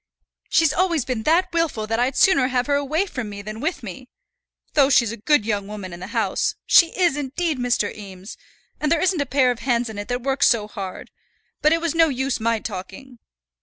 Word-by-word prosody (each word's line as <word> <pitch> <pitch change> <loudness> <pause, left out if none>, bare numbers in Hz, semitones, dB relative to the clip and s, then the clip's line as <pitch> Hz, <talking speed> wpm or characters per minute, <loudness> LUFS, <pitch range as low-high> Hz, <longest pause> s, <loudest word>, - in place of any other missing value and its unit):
She's 325 -2 +3
always 340 -6 +1
been 250 -4 -2
that 340 +3 +2
wilful 325 -10 0
that 225 +1 -2
I'd 250 +3 0
sooner 305 -10 +4
have 250 -1 0
her 285 - 0
away 285 +6 0
from 250 - -6
me 200 0 -8
than 215 +2 -7
with 310 +1 -3
me. 225 +5 -9 0.6
Though 280 -2 +4
she's 235 -5 +3
a 230 - -6
good 255 +1 +2
young 205 -3 -2
woman 200 -3 -7
in 175 - -9
the 185 - -7
house, 220 -4 -1
she 335 - +6
is, 350 -6 +3
indeed, 295 +1 -2
Mr. 245 -4 0
Eames; 195 -1 -10 0.4
and 300 - -1
there 335 - +3
isn't 365 -2 +1
a 285 - -2
pair 260 -2 +3
of 240 - -5
hands 240 -2 0
in 205 - -7
it 205 - -6
that 245 0 -3
works 270 +1 +2
so 220 -4 +1
hard; 195 -3 -7 0.5
but 305 - +4
it 330 0 +2
was 335 -2 -1
no 330 -1 +4
use 265 -1 -2
my 230 +1 +1
talking." 230 +5 -8
255 Hz, 220 wpm, -22 LUFS, 215-300 Hz, 0.6 s, she